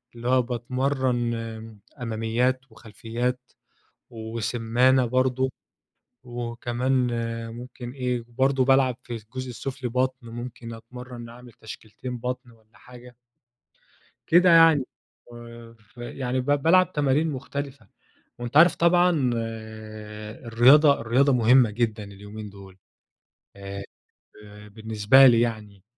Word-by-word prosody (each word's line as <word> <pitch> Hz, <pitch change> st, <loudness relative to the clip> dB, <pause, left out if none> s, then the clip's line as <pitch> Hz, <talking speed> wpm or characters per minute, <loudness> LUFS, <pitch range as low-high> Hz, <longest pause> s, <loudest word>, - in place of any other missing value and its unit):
اللي 120 Hz, +1 st, -6 dB
هو 130 Hz, 0 st, +4 dB
باتمرن 125 Hz, 0 st, -1 dB
آمم 115 Hz, -1 st, -7 dB, 0.2 s
أماميات، 115 Hz, +3 st, 0 dB
وخلفيات، 115 Hz, +3 st, -4 dB, 0.7 s
وسمّانة 115 Hz, +3 st, +1 dB
برضه، 130 Hz, +1 st, 0 dB, 0.7 s
وكمان 120 Hz, +1 st, -2 dB, 0.5 s
ممكن 120 Hz, 0 st, -9 dB
إيه 125 Hz, -2 st, -2 dB
وبرضه 130 Hz, +2 st, +1 dB
بالعب 135 Hz, -2 st, +3 dB
في 120 Hz, -, -7 dB
الجزء 120 Hz, +4 st, -8 dB
السفلي 130 Hz, +1 st, -5 dB
بطن 130 Hz, 0 st, -2 dB
ممكن 120 Hz, 0 st, -8 dB
أتمرن 120 Hz, +1 st, -10 dB
أعمل 120 Hz, +1 st, -13 dB
تشكيلتين 110 Hz, +3 st, -9 dB
بطن 125 Hz, +1 st, -5 dB
والّا 110 Hz, -1 st, -25 dB
حاجة. 125 Hz, 0 st, -15 dB, 1.1 s
كده 180 Hz, +2 st, +5 dB
يعني 165 Hz, -5 st, +6 dB, 0.5 s
آآ 115 Hz, -1 st, -12 dB
ف 105 Hz, +1 st, -29 dB
يعني 125 Hz, +1 st, -3 dB
ب -, -, -9 dB
بالعب 165 Hz, +6 st, +3 dB
تمارين 145 Hz, +2 st, +1 dB
مختلفة، 140 Hz, 0 st, -6 dB, 0.5 s
وأنتَ 120 Hz, +3 st, -1 dB
عارف 170 Hz, +2 st, +7 dB
طبعًا 170 Hz, -6 st, +3 dB, 1.1 s
الرياضة 135 Hz, +6 st, +5 dB
الرياضة 130 Hz, +5 st, +2 dB
مهمة 125 Hz, 0 st, +5 dB
جدًا 110 Hz, -1 st, -2 dB
اليومين 105 Hz, +1 st, -10 dB
دول. 95 Hz, -1 st, -14 dB, 0.8 s
آآ 100 Hz, 0 st, -7 dB, 0.6 s
ب 105 Hz, 0 st, -14 dB
بالنسبة 110 Hz, +4 st, +5 dB
لي 115 Hz, -2 st, +5 dB
يعني 105 Hz, -5 st, -4 dB
120 Hz, 110 wpm, -25 LUFS, 115-130 Hz, 1.1 s, عارف